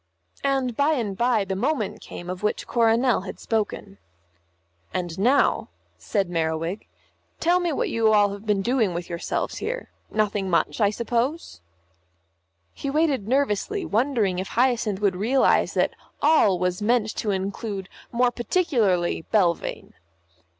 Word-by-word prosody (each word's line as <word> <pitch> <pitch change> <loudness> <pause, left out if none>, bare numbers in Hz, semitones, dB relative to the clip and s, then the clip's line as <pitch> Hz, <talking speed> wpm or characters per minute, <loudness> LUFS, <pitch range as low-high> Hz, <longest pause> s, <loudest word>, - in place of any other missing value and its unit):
And 270 -3 0
by 285 +4 +3
and 220 -9 -2
by 235 -1 +2
the 190 0 -3
moment 235 0 -1
came 175 - -9
of 185 0 -5
which 210 - -1
Coronel 230 0 +2
had 190 - -8
spoken. 210 -2 -3 1.0
"And 175 -1 -3
now," 255 +8 +3 0.3
said 200 -4 -1
Merriwig, 165 +2 -2 0.5
"tell 350 +2 +3
me 350 -2 0
what 285 - -1
you 230 -1 0
have 220 - +5
all 205 -1 +2
been 205 -2 0
doing 230 -7 +1
with 175 0 -5
yourselves 170 - -3
here. - - -4 0.2
Nothing 210 -2 0
much, 180 +5 +1
I 205 - +5
suppose?" 235 - -2 1.1
He 280 - -5
waited 285 -7 +1
nervously, 280 - 0
wondering 220 -5 +1
if 190 - -3
Hyacinth 235 -5 +1
would 200 -3 +2
realise 250 +7 +2
that - - +2 0.3
"all" 290 - +4
was 180 +2 -1
meant 220 0 +1
to 215 - -2
include 195 0 -3 0.2
more 245 +1 +2
particularly 230 - 0
Belvane. 180 -6 0
215 Hz, 140 wpm, -24 LUFS, 190-255 Hz, 1.1 s, have